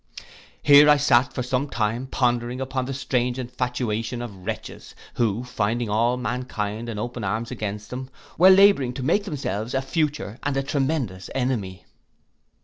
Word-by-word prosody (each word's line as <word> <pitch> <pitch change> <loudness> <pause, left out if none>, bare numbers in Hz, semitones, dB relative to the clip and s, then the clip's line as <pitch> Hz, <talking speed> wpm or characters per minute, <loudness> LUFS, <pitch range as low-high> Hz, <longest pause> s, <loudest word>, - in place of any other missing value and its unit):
Here 145 +1 +8
I 150 - +7
sate 135 -2 +3
for 125 - -3
some 130 +3 -1
time, 115 +2 -1
pondering 120 -1 0
upon 130 -1 -2
the 135 - -4
strange 125 -2 -1
infatuation 125 -2 -3
of 100 -6 -10
wretches, - - -6 0.2
who 115 0 0
finding 115 -1 -1
all 120 +3 +2
mankind 120 -3 -3
in 110 - -5
open 120 +1 -4
arms 110 +5 -2
against 105 -3 -5
them, 130 +1 -6 0.3
were 185 +3 +7
labouring 190 -10 +6
to 130 - -4
make 200 +9 +1
themselves 130 - -3
a 135 - +1
future 145 -6 -2
and 145 -1 -1
a 135 - 0
tremendous 135 - -2
enemy. 110 -9 -2
125 Hz, 155 wpm, -24 LUFS, 115-135 Hz, 0.3 s, Here